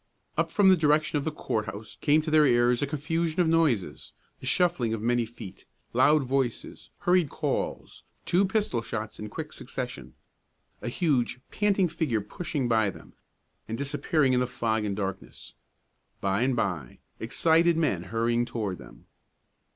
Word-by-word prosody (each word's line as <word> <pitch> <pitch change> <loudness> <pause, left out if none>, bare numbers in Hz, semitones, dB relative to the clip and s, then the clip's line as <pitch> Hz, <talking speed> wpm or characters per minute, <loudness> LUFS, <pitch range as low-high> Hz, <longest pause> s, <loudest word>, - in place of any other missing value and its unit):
Up - - +1
from 205 -2 +4
the 190 - +7
direction 150 -2 +2
of 140 - -6
the 160 - 0
court 110 -7 -3
house 100 +3 -8
came 155 +1 +4
to 155 0 -4
their 155 -1 +6
ears 120 0 +3
a 145 - 0
confusion 160 +3 -2
of 175 - +4
noises; 160 - +1 0.3
the - - -7
shuffling 150 -11 +2
of 110 - -6
many 120 0 +1
feet, 110 -5 -11 0.3
loud 150 -1 +4
voices, 130 -2 -2
hurried 175 -4 +3
calls, - - -3 0.2
two 180 +3 +3
pistol 195 - 0
shots 110 -2 -5
in 105 0 -6
quick - - -6
succession; - - -6 0.7
a - - -3
huge, 125 -4 0
panting 200 -3 +2
figure 150 -8 -1
pushing 145 - -3
by 110 -3 +3
them, - - -12 0.5
and 115 - -4
disappearing 140 0 +1
in 125 - +3
the 125 - +1
fog 110 -3 -1
and 100 -1 -2
darkness; 95 -2 -6 0.7
by 100 +2 0
and 130 0 +2
by, 90 - -2 0.2
excited 165 +8 +3
men 100 - 0
hurrying 115 +3 +1
toward 110 - -4
them. - - -14
125 Hz, 160 wpm, -27 LUFS, 110-160 Hz, 0.7 s, the